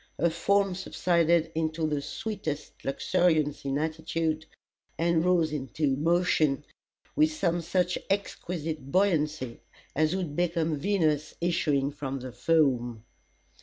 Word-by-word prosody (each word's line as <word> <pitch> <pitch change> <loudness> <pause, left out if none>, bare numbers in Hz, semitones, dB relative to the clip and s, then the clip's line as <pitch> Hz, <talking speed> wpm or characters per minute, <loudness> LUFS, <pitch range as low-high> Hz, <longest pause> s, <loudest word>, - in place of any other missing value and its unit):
Her 170 +2 +2
form 195 +3 +2
subsided 170 -3 +1
into 160 0 -1
the 150 -2 0
sweetest 155 -5 -4
luxuriance 155 0 +1
of 135 0 0
attitude, 160 0 -2 0.5
and 165 -1 +2
rose 170 -4 +2
into 135 0 -1
motion 155 -2 +2 0.5
with 310 +1 +4
some 175 - 0
such 180 +1 0
exquisite 165 -7 -3
buoyancy, 155 -9 +1 0.3
as 155 +4 +2
would 175 -6 -3
become 165 -3 0
Venus 155 -5 +1
issuing 150 -5 +1
from 135 -2 -4
the 130 0 -6
foam. 125 -7 +1
160 Hz, 115 wpm, -28 LUFS, 145-175 Hz, 0.5 s, with